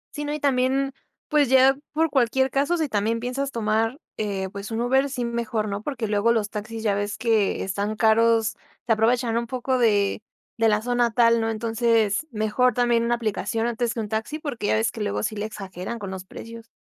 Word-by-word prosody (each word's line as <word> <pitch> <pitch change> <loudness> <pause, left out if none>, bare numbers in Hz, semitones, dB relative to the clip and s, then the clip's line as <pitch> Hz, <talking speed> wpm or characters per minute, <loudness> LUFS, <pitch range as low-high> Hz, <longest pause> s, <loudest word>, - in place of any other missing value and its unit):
Sí, 295 0 -4
no, 295 - -2
y - - -5
también 270 0 +1 0.3
pues 295 -4 +3
ya 265 +1 +6 0.2
por 320 0 +1
cualquier 265 +1 +2
caso, 285 +6 +1
si 315 -2 0
también 220 0 0
piensas 260 +3 -2
tomar, 225 +3 0 0.2
eh, 195 -3 -2
pues 200 +1 -7
un 225 0 -3
Uber 265 +3 +2
sí, 250 -2 -3
mejor, 230 -2 -2
¿no?, 200 0 -3
porque 240 -3 -3
luego 210 +2 +2
los 215 -3 0
taxis 220 +1 -6
ya 205 -2 +2
ves 205 +1 -2
que 220 -3 +1
están 200 +3 -2
caros. 225 0 +3 0.3
Se 235 - -1
aprovechan 230 +1 +1
un 235 0 -2
poco 255 0 -1
de 205 -3 +2 0.4
de 225 -1 +3
la 210 +1 +1
zona 245 -1 +2
tal, 230 -1 +4
¿no? 225 - 0
Entonces 225 +2 +1
mejor 220 +3 +1
también 240 -1 +2
una 240 0 +1
aplicación 225 0 -2
antes 240 +1 -1
que - - -3
un 210 - -4
taxi 220 +8 -3
porque 270 -9 -4
ya - - +3
ves 225 +1 +1
que 225 - -7
luego 205 0 -1
sí 215 - -2
le 210 +1 -3
exageran 195 +1 -6
con 200 -3 -6
los 185 -1 -7
precios. 230 +3 -10
230 Hz, 210 wpm, -24 LUFS, 215-250 Hz, 0.4 s, ya